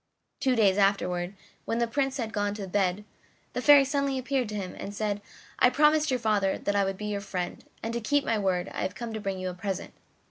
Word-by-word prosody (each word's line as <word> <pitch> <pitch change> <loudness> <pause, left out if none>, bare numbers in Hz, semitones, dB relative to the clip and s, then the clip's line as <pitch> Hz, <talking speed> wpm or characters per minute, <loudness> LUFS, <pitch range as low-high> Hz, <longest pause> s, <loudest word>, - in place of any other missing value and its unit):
Two 260 -2 +2
days 205 -3 +4
afterward, 190 -2 +1 0.3
when 230 - -1
the 235 - +2
Prince 270 +3 -1
had 230 -4 -3
gone 205 -1 0
to 205 -2 -5
bed, 195 +1 0 0.5
the 250 - -2
Fairy 285 0 +8
suddenly 280 -1 0
appeared 260 -2 -1
to 210 - -5
him 190 -3 -4
and 205 - -6
said: 205 -1 -1 0.4
"I 250 - +6
promised 300 +3 +4
your 255 -1 +1
father 210 -4 +1
that 205 - -2
I 200 - +4
would 195 0 -2
be 210 - -5
your 205 -1 -2
friend, 180 -3 -4 0.2
and 225 +1 -2
to 235 - -2
keep 285 +6 +1
my 225 - +1
word 185 -2 0
I - - -5
have 185 - -2
come 235 -2 -5
to 220 - -4
bring 195 -1 -2
you 185 0 -3
a - - -8
present." 190 +1 -4
210 Hz, 240 wpm, -28 LUFS, 195-250 Hz, 0.5 s, Fairy